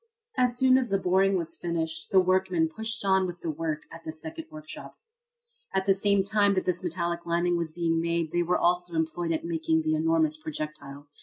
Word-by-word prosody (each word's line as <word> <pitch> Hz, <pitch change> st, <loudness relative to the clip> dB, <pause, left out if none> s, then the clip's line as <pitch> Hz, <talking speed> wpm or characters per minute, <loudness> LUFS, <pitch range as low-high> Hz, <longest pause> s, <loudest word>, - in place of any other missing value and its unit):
As 245 Hz, -1 st, +2 dB
soon 260 Hz, 0 st, +5 dB
as 250 Hz, -3 st, -2 dB
the 195 Hz, -, +2 dB
boring 190 Hz, +1 st, +2 dB
was 165 Hz, -1 st, -3 dB
finished 160 Hz, -2 st, -3 dB
the 190 Hz, -, +5 dB
workmen 185 Hz, -2 st, +2 dB
pushed 220 Hz, +5 st, -2 dB
on 190 Hz, -1 st, +3 dB
with 175 Hz, -1 st, -7 dB
the 165 Hz, -, -2 dB
work 155 Hz, 0 st, -3 dB
at 165 Hz, 0 st, -11 dB
the 160 Hz, -, -5 dB
second 320 Hz, -, -7 dB
workshop. 310 Hz, 0 st, -10 dB, 0.8 s
At 190 Hz, 0 st, +1 dB
the 195 Hz, -, +5 dB
same 200 Hz, 0 st, +2 dB
time 205 Hz, 0 st, +2 dB
that 185 Hz, -, 0 dB
this 180 Hz, 0 st, -1 dB
metallic 170 Hz, 0 st, -2 dB
lining 175 Hz, +1 st, +1 dB
was 170 Hz, -2 st, -2 dB
being 165 Hz, 0 st, 0 dB
made 170 Hz, -1 st, -1 dB
they 175 Hz, -, +1 dB
were 175 Hz, +1 st, +1 dB
also 175 Hz, 0 st, +1 dB
employed 165 Hz, +1 st, -1 dB
at 160 Hz, 0 st, -2 dB
making 160 Hz, -1 st, 0 dB
the 155 Hz, 0 st, +1 dB
enormous 160 Hz, -1 st, +2 dB
projectile. 150 Hz, -2 st, -7 dB
175 Hz, 205 wpm, -27 LUFS, 160-190 Hz, 0.8 s, soon